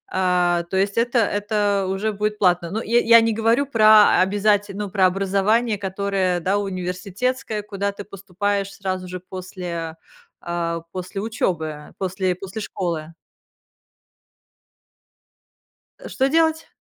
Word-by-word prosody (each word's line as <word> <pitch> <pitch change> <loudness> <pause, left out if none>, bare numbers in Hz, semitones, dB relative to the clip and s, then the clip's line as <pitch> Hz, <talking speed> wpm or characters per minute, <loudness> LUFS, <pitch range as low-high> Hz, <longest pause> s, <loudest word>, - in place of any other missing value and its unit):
а, 180 -2 +2
то 190 - -1
есть 195 +2 0
это 240 +1 +2
это 205 -2 0
уже 205 +3 -1
будет 210 +1 -2
платно. 175 -3 +2
Ну, 220 +2 -2
я 235 +2 +2
я 230 0 +7
не 225 0 +1
говорю 225 +5 +2
про 215 -6 +6
обязате 205 +1 +1
ну, 205 -1 -4
про 190 -1 +2
образование, 200 +4 +1
которое, 190 -2 -1
да, 190 +4 0
университетское, 200 +5 -3
куда 200 -1 -3
ты 200 0 -9
поступаешь 200 0 -3
сразу 185 -1 -4
же 185 - -5
после, 180 -3 -6 0.4
а, 170 -1 -3
после 185 +1 -5
учёбы, 160 -8 -3
после 185 -1 -1
после 195 +4 -7
школы. 170 -5 -4 2.9
Э, - - -9
что 265 0 +1
делать? 320 +1 +2
195 Hz, 130 wpm, -22 LUFS, 185-215 Hz, 2.9 s, я